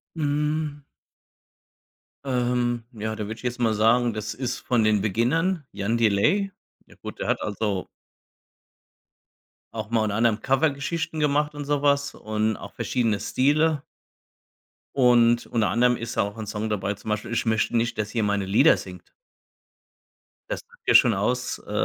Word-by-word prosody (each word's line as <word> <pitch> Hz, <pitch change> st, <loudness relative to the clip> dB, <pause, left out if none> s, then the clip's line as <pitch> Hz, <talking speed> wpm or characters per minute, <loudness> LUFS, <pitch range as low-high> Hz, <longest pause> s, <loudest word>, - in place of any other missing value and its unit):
Mhm. 150 Hz, 0 st, -1 dB, 1.4 s
Ähm, 125 Hz, -2 st, 0 dB
ja, 110 Hz, -2 st, -4 dB
da 105 Hz, -, -4 dB
würde 110 Hz, +2 st, -5 dB
ich 115 Hz, -, -15 dB
jetzt 125 Hz, 0 st, -3 dB
mal 115 Hz, -2 st, +2 dB
sagen, 115 Hz, +2 st, +3 dB
das 110 Hz, 0 st, -4 dB
ist 130 Hz, -1 st, -3 dB
von 120 Hz, -3 st, +1 dB
den 105 Hz, -2 st, +3 dB
Beginnern, 145 Hz, -, +1 dB
Jan 110 Hz, +4 st, -1 dB
Delay. 115 Hz, -, +2 dB, 0.3 s
Ja -, -, -19 dB
gut, -, -, -8 dB
der -, -, -3 dB
hat, -, -, +1 dB
also 105 Hz, -2 st, -2 dB, 1.9 s
auch 110 Hz, 0 st, -5 dB
mal, 115 Hz, -, +2 dB
unter 105 Hz, -1 st, -1 dB
anderem, 115 Hz, -1 st, +2 dB
Covergeschichten 150 Hz, +3 st, 0 dB
gemacht 150 Hz, 0 st, +1 dB
und 145 Hz, -1 st, -6 dB
so 145 Hz, 0 st, 0 dB
was 140 Hz, 0 st, +2 dB
und 110 Hz, 0 st, -1 dB
auch -, -, -10 dB
verschiedene 115 Hz, -5 st, 0 dB
Stile 150 Hz, +2 st, +1 dB, 1.1 s
und 120 Hz, -2 st, +4 dB
unter 115 Hz, -3 st, +1 dB
anderem 125 Hz, +1 st, +3 dB
ist 115 Hz, -1 st, -6 dB
auch 100 Hz, 0 st, 0 dB
'n 110 Hz, -1 st, -6 dB
Song 105 Hz, +1 st, -3 dB
dabei, 100 Hz, -1 st, -1 dB
zum 105 Hz, +2 st, -9 dB
Beispiel 105 Hz, +2 st, -2 dB
„Ich 115 Hz, -, -1 dB
möchte 110 Hz, +1 st, +1 dB
nicht, 115 Hz, 0 st, -1 dB
dass 110 Hz, +1 st, -3 dB
ihr 115 Hz, -, +1 dB
meine 100 Hz, -1 st, 0 dB
Lieder 115 Hz, +12 st, +5 dB
singt.“ 90 Hz, -1 st, -10 dB, 1.4 s
Das -, -, -3 dB
sagt 485 Hz, 0 st, -24 dB
ja -, -, +4 dB
schon -, -, +7 dB
aus, -, -, -1 dB
äh, -, -, -12 dB
120 Hz, 160 wpm, -25 LUFS, 110-140 Hz, 1.9 s, schon